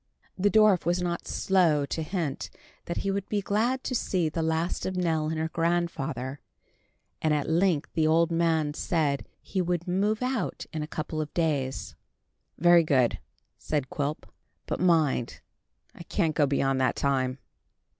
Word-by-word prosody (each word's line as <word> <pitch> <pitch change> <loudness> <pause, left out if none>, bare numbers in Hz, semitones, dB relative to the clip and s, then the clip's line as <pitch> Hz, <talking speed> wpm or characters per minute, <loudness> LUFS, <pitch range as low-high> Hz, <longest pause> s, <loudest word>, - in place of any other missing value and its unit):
The 200 +2 +2
dwarf 215 -4 +5
was 175 +2 +1
not 175 -1 -3
slow 170 -7 +2
to 160 - -3
hint 160 -4 -3 0.4
that 170 - -4
he 195 - +1
would 195 0 -3
be 210 - +1
glad 225 +6 0
to - - -3
see 180 -8 0
the 165 +2 -3
last 160 +2 -1
of 185 0 -3
Nell 160 -3 0
and 160 - -2
her 160 +1 -1
grandfather, 160 -6 -1 0.8
and 155 -1 +2
at 145 - -1
length 165 -2 +1
the 155 -1 +2
old 165 +1 +3
man 165 -3 +1
said 150 -4 -1 0.2
he 190 - -1
would 175 -1 -1
move 205 +6 +1
out 255 -6 -2
in 155 - -2
a 150 - -4
couple 155 0 -3
of 150 - -5
days. 145 -6 -1 0.6
"Very 175 +1 +6
good," 130 -6 +2 0.4
said 145 -4 -2
Quilp; 145 +1 -3 0.4
"but - - -3
mind, 160 -9 +2 0.5
I - - -12
can't 165 -1 0
go 150 -2 +3
beyond 135 -1 +1
that 130 - +2
time." 130 -2 0
165 Hz, 165 wpm, -27 LUFS, 150-180 Hz, 0.8 s, Very